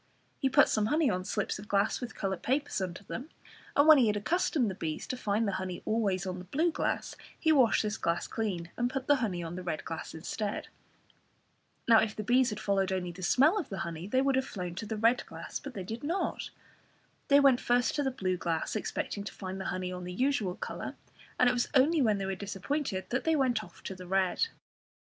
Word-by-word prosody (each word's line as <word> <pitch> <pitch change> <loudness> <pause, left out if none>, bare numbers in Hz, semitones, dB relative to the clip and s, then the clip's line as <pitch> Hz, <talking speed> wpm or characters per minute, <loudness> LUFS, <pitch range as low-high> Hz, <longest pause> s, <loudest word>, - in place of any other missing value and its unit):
He 270 - +2
put - - +6
some 215 -1 +1
honey 300 -1 +3
on 185 -1 -2
slips 210 0 -2
of 205 - -10
glass 200 +4 +1
with 245 - -6
coloured 190 -3 -2
papers 275 -4 0
under 185 +1 -4
them, 255 +9 -6 0.5
and 285 +2 +5
when 310 -3 +9
he 240 - +4
had 210 -1 +1
accustomed 285 - +1
the 195 - -2
bees 160 -4 -4
to - - -3
find 220 -2 0
the - - +1
honey 185 -1 -5
always 200 -4 0
on 185 -1 -4
the 180 - -9
blue 315 - +1
glass, - - -2 0.2
he 320 - +3
washed 260 -8 +4
this 215 0 -2
glass 170 +1 0
clean, 180 -7 -3
and 245 0 0
put 260 0 -3
the 290 0 +4
honey 195 -9 -2
on 165 0 -5
the 185 - -5
red 170 -4 -4
glass 165 0 -6
instead. 205 +5 -4 1.2
Now 230 -1 +8
if 215 -2 0
the 215 - -4
bees 245 +3 +4
had 210 -1 -5
followed 195 -2 +1
only 180 -2 -2
the 175 +2 -11
smell 290 - +4
of 340 - -5
the 195 - -5
honey, 170 +1 -6
they 260 +5 +2
would 275 -1 +2
have 265 0 0
flown 180 -3 -5
to 200 +5 -6
the 220 0 -3
red 230 +3 +3
glass, - - -6
but 280 -2 -9
they 190 - -4
did 225 +7 -6
not. 340 +6 -2 0.8
They 280 0 +7
went 270 -3 +5
first 245 -1 +2
to 290 - 0
the 270 - +1
blue 185 -8 -1
glass, 165 +1 -2
expecting 205 -1 -3
to - - -5
find 190 -1 -6
the - - -5
honey 185 0 -2
on 180 0 -6
the 180 - -5
usual 220 -5 0
colour, - - -5 0.4
and 250 - +6
it - - +4
was 240 -1 0
only 295 +4 +5
when 215 -5 +3
they 195 - -3
were 195 - -1
disappointed 200 +3 -3
that 250 - -1
they 320 0 +2
went 250 -6 +1
off 180 -1 -15
to - - -5
the 185 -1 -10
red. 190 - +2
210 Hz, 235 wpm, -30 LUFS, 185-260 Hz, 1.2 s, when